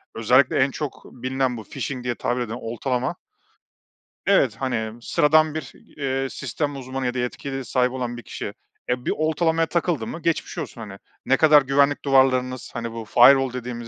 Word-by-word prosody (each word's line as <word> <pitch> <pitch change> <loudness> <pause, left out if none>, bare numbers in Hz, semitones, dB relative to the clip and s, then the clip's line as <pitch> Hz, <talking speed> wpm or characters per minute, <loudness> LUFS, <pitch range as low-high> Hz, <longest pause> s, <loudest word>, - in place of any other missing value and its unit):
özellikle 125 +4 +3
en 135 +1 +3
çok 145 0 -5
bilinen 130 0 -2
bu 110 - -7
phishing 125 +5 -5
diye 120 -1 -2
tabir 125 +2 -1
eden 115 -2 -4
oltalama 125 +3 -2 1.1
evet, - - +3
hani 120 -3 -3
sıradan 155 +4 +3
bir, 155 - -5 0.3
eee, 135 -1 -1
sistem 145 +3 -3
uzmanı 130 0 -5
ya 125 - 0
da 125 - -3
yetkili 135 +2 -4
sahibi 125 0 +1
olan 125 -2 -4
bir 120 - -9
kişi, - - -6 0.4
eee, 125 0 -1
bir - - +1
oltalamaya 160 +1 +1
takıldı 165 -9 -1
mı 170 - -6
geçmiş 165 +1 -1
olsun. 140 -7 -6
Hani, 100 -3 -8 0.3
ne 135 - +3
kadar 155 -2 +7
güvenlik 140 +2 +2
duvarlarınız, 130 -2 +2
hani 115 0 -4
bu 115 -1 -7
firewall 130 +3 +6
dediğimiz 120 -2 -6
130 Hz, 175 wpm, -23 LUFS, 120-140 Hz, 1.1 s, kadar